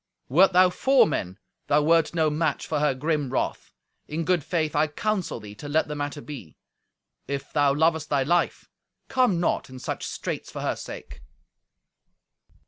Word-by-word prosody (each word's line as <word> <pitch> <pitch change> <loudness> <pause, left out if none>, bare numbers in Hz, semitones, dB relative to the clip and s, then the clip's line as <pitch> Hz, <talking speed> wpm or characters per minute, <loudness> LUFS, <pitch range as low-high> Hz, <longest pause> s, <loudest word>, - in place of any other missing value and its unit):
Wert 180 +9 +5
thou 180 0 +5
four 265 +7 +4
men, 95 - -3 0.3
thou 150 +1 +3
wert 165 +2 +3
no 160 -2 +2
match 150 -1 -1
for 150 - -1
her 150 -2 +2
grim 150 0 -1
wrath. - - -2 0.4
In 160 +2 -3
good 180 -3 +2
faith 155 -3 -1
I 150 +1 +3
counsel 190 - -2
thee 105 -1 -10
to 145 +8 -9
let 155 +2 +2
the 150 - -4
matter 145 0 -4
be. 130 - -10 0.7
If 140 -1 -5
thou 145 -2 +3
lovest 160 0 +2
thy 140 -2 +2
life, 175 +5 0 0.4
come 250 -9 +2
not 175 - 0
in 130 - -10
such - - -4
straits - - -5
for - - -6
her - - -1
sake." - - -9
150 Hz, 170 wpm, -25 LUFS, 145-170 Hz, 0.7 s, Wert